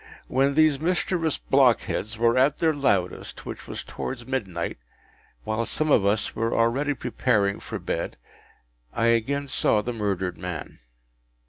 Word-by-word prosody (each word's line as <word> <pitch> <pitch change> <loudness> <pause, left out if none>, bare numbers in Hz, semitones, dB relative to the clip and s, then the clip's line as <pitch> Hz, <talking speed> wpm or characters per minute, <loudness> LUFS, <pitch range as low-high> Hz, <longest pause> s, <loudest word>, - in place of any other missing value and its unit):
When 135 +2 +2
these 155 -3 +4
mischievous 170 -1 0
blockheads 115 -4 +2
were 115 +1 +3
at 135 +3 +3
their 160 -1 +2
loudest, 100 -11 -1
which - - -7
was - - -5
towards 120 -2 -6
midnight, 95 - -3 0.6
while 110 - -1
some 155 +6 0
of 105 - +5
us 105 +2 0
were 115 +1 0
already 135 +6 +2
preparing 115 -5 0
for - - -6
bed, - - -3 0.8
I 115 - +1
again 140 +5 0
saw 110 -4 +2
the 120 - -3
murdered 100 -5 -2
man. 90 -3 -6
120 Hz, 140 wpm, -25 LUFS, 105-140 Hz, 0.8 s, of